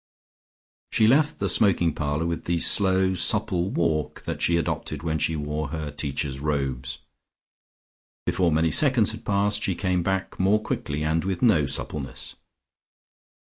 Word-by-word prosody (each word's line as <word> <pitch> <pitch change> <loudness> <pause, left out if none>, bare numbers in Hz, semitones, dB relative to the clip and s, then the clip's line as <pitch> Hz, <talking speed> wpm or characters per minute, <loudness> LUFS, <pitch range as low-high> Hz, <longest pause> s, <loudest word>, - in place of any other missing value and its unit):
She 110 - +3
left 145 +6 +3
the 100 - -1
smoking 90 -4 +3
parlour 75 +2 -2
with 85 -1 -3
the 85 0 0
slow 95 0 +3
supple 95 -1 +1
walk 80 -5 -1
that - - -5
she 85 - +3
adopted 75 -2 -3
when 80 -1 -1
she 80 - +1
wore 75 0 -3
her 75 0 -5
Teacher's 70 -1 -3
Robes. 70 -3 -2 1.3
Before 90 -3 +1
many 80 +1 +2
seconds 125 - +3
had 110 - -8
passed, 105 +1 +1
she 95 -3 0
came 90 -1 0
back 95 +2 -2
more 100 +3 +3
quickly 75 -7 -3
and 80 +1 0
with 95 -2 -3
no 80 - +4
suppleness. 70 -1 -3
85 Hz, 145 wpm, -25 LUFS, 75-95 Hz, 1.3 s, no